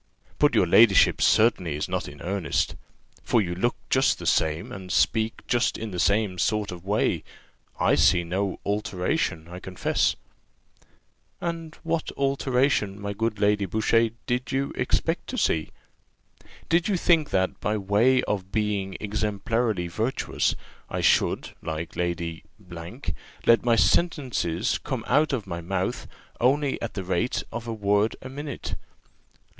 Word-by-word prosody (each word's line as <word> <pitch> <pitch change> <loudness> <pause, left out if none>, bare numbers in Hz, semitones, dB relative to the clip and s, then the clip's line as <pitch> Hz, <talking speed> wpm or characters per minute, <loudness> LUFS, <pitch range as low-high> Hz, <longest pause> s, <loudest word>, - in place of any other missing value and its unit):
But - - +4
your - - +5
ladyship 100 +2 +5
certainly 95 -9 +3
is 75 - -2
not - - -2
in 70 0 -10
earnest? 90 -4 -1 0.5
for 120 - +2
you 90 -4 -1
look 120 +8 0 0.2
just - - +3
the - - -8
same, 80 +1 +1
and 95 -2 -7
speak 110 0 +1
just 120 -1 +1
in 110 -1 -5
the 90 - -4
same 100 -2 +1
sort 105 0 0
of 90 -1 -8
way: 100 +2 0 0.6
I - - +3
see 85 +5 +4
no 95 +3 -2
alteration, 95 - -1
I 90 +1 -8
confess." 90 -1 0 1.2
"And 165 -2 -4
what 165 -1 -1
alteration, 135 -6 +1
my 100 0 -4
good 115 +1 -1
Lady 105 -1 +2
Boucher, 115 +3 +2 0.2
did 125 +2 -2
you 135 0 -1
expect 165 +2 0
to 255 - -4
see? 80 - +1 1.0
Did 170 +1 +2
you 200 -3 +1
think 165 -4 +3
that, 95 0 0
by 105 +1 0
way 110 +6 +3
of 95 -2 -3
being 105 -3 -1
exemplarily 105 -1 -1
virtuous, 110 +9 -1 0.3
I - - -2
should, - - +2
like 80 +1 -5
Lady 85 -2 -3 0.2
Q, 85 -1 -9 0.4
let 115 - +5
my 120 -1 +4
sentences 125 - +1
come 130 -6 -3
out 155 +1 +3
of 120 -7 -2
my 85 -3 -5
mouth 95 +2 -2 0.3
only 135 +3 +2
at 115 - -4
the 95 - -3
rate 95 +7 -1
of 115 0 -6
a 115 - -2
word 105 0 +1
a 130 - -7
minute? 140 0 -6
105 Hz, 150 wpm, -25 LUFS, 90-125 Hz, 1.2 s, your